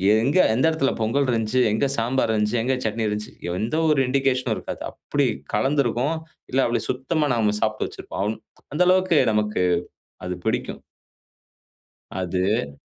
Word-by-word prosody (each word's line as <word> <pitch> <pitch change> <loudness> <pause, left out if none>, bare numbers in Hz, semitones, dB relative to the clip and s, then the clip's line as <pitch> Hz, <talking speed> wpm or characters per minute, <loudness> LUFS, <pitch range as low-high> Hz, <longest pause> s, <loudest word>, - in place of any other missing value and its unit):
எங்க 135 +10 +2 0.2
எந்த 130 - +2
இடத்துல 140 -4 +1
பொங்கல் 130 +6 +1
இருந்துச்சு? 115 +2 +1
எங்க 110 +6 +1
சாம்பாரு 115 0 +1
இருந்துச்சு? 105 +2 +1
எங்க 130 +2 +1
சட்னி 110 +1 -1
இருந்துச்சு? 105 0 -4 0.3
எந்த 115 +7 -1
ஒரு 150 -3 +3
இண்டிகேஷனும் 130 -1 +1
இருக்காது. - - -7
அப்பிடி 145 -2 -1 0.3
கலந்திருக்கும். 135 +4 +1 0.4
இல்ல, 130 - +1
அப்பிடி 120 - 0
சுத்தமா 150 +4 0
நாம 105 -2 +1
சாப்டு 110 0 0
வச்சிருப்போம். - - -7
அம் 110 +1 -3 0.3
அந்த 150 - 0
அளவுக்கு 185 -4 +4
நமக்கு 105 -3 0 0.6
அது 90 0 -3
பிடிக்கும். - - -2 1.3
அது. 90 -5 -1
120 Hz, 140 wpm, -23 LUFS, 105-135 Hz, 1.3 s, அளவுக்கு